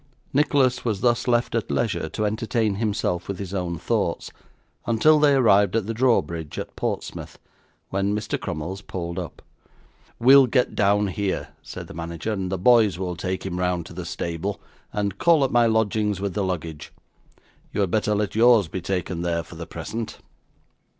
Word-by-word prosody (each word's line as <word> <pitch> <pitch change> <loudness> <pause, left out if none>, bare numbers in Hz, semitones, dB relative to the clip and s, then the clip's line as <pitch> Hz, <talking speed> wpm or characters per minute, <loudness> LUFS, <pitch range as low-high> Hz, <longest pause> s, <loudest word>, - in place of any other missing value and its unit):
Nicholas 135 -3 +2
was 110 -5 -1
thus 120 0 +2
left 120 -1 +2
at 115 -2 -1
leisure 105 -8 -1
to 105 +7 -2
entertain 110 -1 0
himself 100 -5 -1
with 100 - -4
his 100 -1 -6
own 90 -3 -2
thoughts, - - -1 0.6
until 150 +7 +4
they 145 -2 +5
arrived 100 -6 +4
at 115 -3 +1
the 115 - -3
drawbridge 85 - 0
at - - -6
Portsmouth, - - -4 0.5
when 100 +1 0
Mr. 105 +1 -2
Crummles 85 +6 -5
pulled 85 -3 -5
up. - - -8 0.8
'We'll 135 +2 +7
get 125 +1 +1
down 105 +1 +3
here,' 95 +1 -2
said - - -8
the - - -11
manager, 85 +6 -4
'and 95 -3 -3
the 95 - -1
boys 110 -2 +4
will 90 -1 -3
take 95 +2 -4
him 90 -2 -3
round 90 -2 0
to - - -11
the 90 +1 -6
stable, 85 +3 -3 0.3
and 100 -2 -2
call 165 -4 +4
at 135 - 0
my 120 -1 +4
lodgings 110 -2 +1
with 100 -1 -2
the 100 - -1
luggage. 85 -5 -4 0.8
You - - -1
had 95 -3 0
better 105 0 +1
let 105 -1 -1
yours 115 -4 +5
be 90 +3 -5
taken 90 -2 -2
there, 85 -1 -1
for - - -14
the - - -8
present. 115 0 -5
100 Hz, 175 wpm, -24 LUFS, 90-115 Hz, 0.8 s, We'll